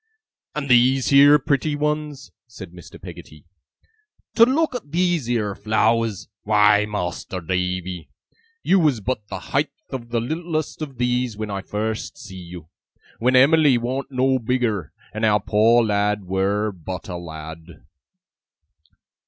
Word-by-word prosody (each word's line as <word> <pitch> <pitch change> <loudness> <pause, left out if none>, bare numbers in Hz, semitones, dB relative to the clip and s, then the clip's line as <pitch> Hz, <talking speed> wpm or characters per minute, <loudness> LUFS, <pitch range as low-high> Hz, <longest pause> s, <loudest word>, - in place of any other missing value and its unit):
'And 150 -2 -3
these 125 +1 +4
heer 145 +1 +7
pretty 145 +1 -1
ones,' 150 -1 -3 0.2
said 100 -7 -11
Mr. 90 -1 -13
Peggotty. 75 0 -12 0.9
'To 230 - +7
look 310 +4 +1
at 220 - -7
these 175 -5 0
heer 110 -4 -1
flowers! 110 0 0
Why, 105 0 +4
Mas'r 95 -2 -4
Davy, 90 0 -3 0.5
you 195 - +4
was 150 -8 +2
but 105 0 -4
the 95 -2 -8
heighth 145 0 -2
of 120 -3 -6
the 115 0 0
littlest 155 +5 -3
of 140 -5 -6
these, 125 -2 -1
when 110 -1 -4
I 100 -1 -3
first 110 +2 -4
see 95 -3 -10
you! 85 -2 -10 0.5
When 125 +3 +2
Em'ly 140 0 +5
warn't 130 +3 -3
no 130 0 +1
bigger, 115 - -1 0.2
and 110 - -5
our 105 -1 +4
poor 110 +4 +3
lad 105 -1 0
were 100 +3 0
BUT 90 0 -8
a 90 -2 -5
lad! 80 0 -10
115 Hz, 140 wpm, -22 LUFS, 100-135 Hz, 0.9 s, heer